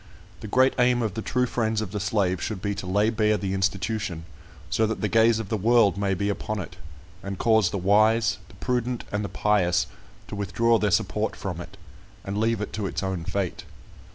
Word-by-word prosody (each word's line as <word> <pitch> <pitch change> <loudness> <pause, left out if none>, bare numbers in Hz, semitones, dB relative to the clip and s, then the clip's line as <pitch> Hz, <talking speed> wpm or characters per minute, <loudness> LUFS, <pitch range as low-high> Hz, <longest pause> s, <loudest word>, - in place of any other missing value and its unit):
The 110 - -7
great 130 +5 +4
aim 125 -1 +3
of 110 -4 -2
the 110 - -4
true 125 +3 0
friends 110 -3 -1
of 110 -4 -4
the 105 - -3
slave 95 -3 0
should 110 -4 -3
be 100 +2 -2
to 95 - -6
lay 105 +4 +2
bare 110 -1 +2
the 95 -2 -3
institution, 95 -2 -2 0.5
so 110 +5 +2
that 110 - -3
the 105 - 0
gaze 115 +1 +4
of 110 -4 -5
the 110 - 0
world 110 -2 +4
may 100 -1 0
be 100 +3 -1
upon 105 +1 -2
it, 90 -1 -7 0.5
and 100 -1 -5
cause 110 -3 +3
the 100 - -3
wise, 110 +3 +3
the - - -17
prudent, 125 -1 -2
and 105 0 -1
the 100 - -4
pious 95 -3 +2 0.4
to - - -10
withdraw 110 +3 +2
their 105 - +1
support - - 0
from - - -5
it, - - -11 0.5
and 100 +3 -3
leave 115 -1 +1
it 105 - -5
to 105 -2 -2
its 95 - -3
own 95 -3 -3
fate. 95 -1 -3
105 Hz, 210 wpm, -25 LUFS, 95-110 Hz, 0.5 s, great